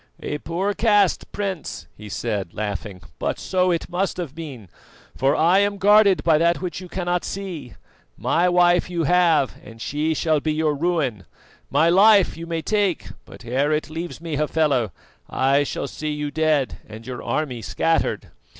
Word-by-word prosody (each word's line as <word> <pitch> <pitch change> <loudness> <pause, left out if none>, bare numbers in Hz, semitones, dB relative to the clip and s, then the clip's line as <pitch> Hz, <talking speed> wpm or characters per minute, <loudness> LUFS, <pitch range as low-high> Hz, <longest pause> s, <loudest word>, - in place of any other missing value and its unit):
"A 150 - -3
poor 185 +6 -2
cast, 205 -4 +2
Prince," 195 -6 -4
he 105 0 -10
said 100 -5 -3
laughing; 100 -2 -5 0.2
"but - - -1
so 185 -1 0
it 170 -2 -1
must 180 +1 -2
have 170 -7 -5
been, 145 - -8 0.5
for 135 +2 +2
I 175 +4 +4
am 200 0 +1
guarded 205 -1 +5
by 160 -2 +4
that 170 +1 +2
which 180 0 -5
you 180 - -10
cannot 175 0 -1
see. 180 -10 -6 0.4
My 175 +2 +2
wife 175 0 +3
you 170 -2 -1
have, 165 -4 +3
and 115 -1 -13
she 150 +6 -1
shall 155 0 +1
be 155 +1 -1
your 155 -1 +1
ruin; 145 - -1 0.4
my 165 - +3
life 195 +2 +5
you 165 +1 -8
may 165 -1 -3
take, 205 -3 0 0.2
but 125 - -13
ere 135 +5 0
it 155 0 -1
leaves 165 +1 -5
me, 165 -3 -4
Hafela, 150 -7 +1 0.4
I 135 +2 +2
shall - - -4
see 155 - -5
you 150 -1 -3
dead 155 -3 +1
and 110 +1 -10
your 125 -1 -6
army 135 -7 -2
scattered. 165 +7 -1
160 Hz, 170 wpm, -22 LUFS, 140-180 Hz, 0.5 s, guarded